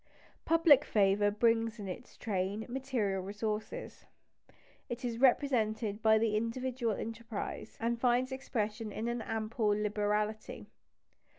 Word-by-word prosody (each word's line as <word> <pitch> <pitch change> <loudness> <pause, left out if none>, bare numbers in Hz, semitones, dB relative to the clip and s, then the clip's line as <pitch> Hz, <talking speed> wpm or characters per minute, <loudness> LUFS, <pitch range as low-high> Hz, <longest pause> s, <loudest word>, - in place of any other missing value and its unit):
Public 320 -4 +6
favour 205 -2 +3
brings 225 +1 +2
in 205 -2 -6
its 215 +7 -8
train 200 0 -2
material 245 -7 -1
resources. 210 - -5 0.8
It 240 +1 -4
is 235 -1 -3
represented 225 -5 +2
by 220 0 +5
individual 230 +2 0
enterprise, 225 -1 -6
and 235 +1 -1
finds 250 +1 +2
expression 220 -4 -3
in 220 +3 -3
an 235 0 -2
ample 220 0 -2
liberality. 210 +1 -1
225 Hz, 110 wpm, -32 LUFS, 210-240 Hz, 0.8 s, Public